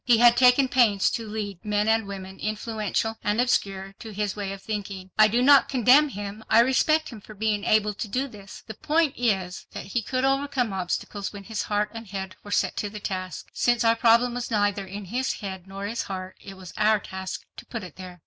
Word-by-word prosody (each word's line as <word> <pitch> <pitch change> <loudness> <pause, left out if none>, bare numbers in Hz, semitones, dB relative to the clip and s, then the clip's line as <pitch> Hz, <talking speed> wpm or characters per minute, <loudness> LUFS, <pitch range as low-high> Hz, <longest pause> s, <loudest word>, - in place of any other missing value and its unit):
He 240 -2 +5
had 240 +1 +7
taken 250 +2 +5
pains 230 -6 +3
to 230 -2 -4
lead 205 -4 -5
men 210 0 0
and 220 -1 +2
women 190 -1 -8
influential 220 +1 -2
and 210 +2 0
obscure—to 195 -3 -1
his 205 -1 -2
way 200 -2 -4
of 195 - -6
thinking. 195 -3 -5
I 215 0 +7
do 235 +4 +1
not 280 0 +6
condemn 270 +4 +5
him—I 205 0 0
respect 310 +5 +2
him 225 -4 -10
for 215 - -13
being 210 0 0
able 210 -1 +2
to 215 - -5
do 255 +7 -1
this. 205 -5 -12
The 220 - -7
point 310 +5 +1
is 190 -7 -1
that - - -6
he 240 - +1
dirt 255 +4 -2
overcome 270 -5 0
obstacles 190 +2 -3
when 200 -1 -9
his 220 +1 -3
heart 210 0 -1
and 225 -1 -8
head 190 -1 -6
were 205 - -10
set 205 - 0
to 205 - -2
the 210 +1 -8
task. 185 -3 -5
Since 240 -1 +2
our 230 0 +4
problem 235 +1 +4
was 245 0 -4
neither 205 -3 0
in 200 +2 -7
his 250 +7 -1
head 190 -3 -7
nor 195 +1 -6
his 225 +3 -2
heart, 185 -1 -6
it 195 -1 -10
was 185 -1 -11
our 215 0 +4
task 190 -1 -6
to - - -9
put 230 -4 -5
it 180 -4 -10
there. 180 -1 -10
210 Hz, 215 wpm, -25 LUFS, 195-235 Hz, -, had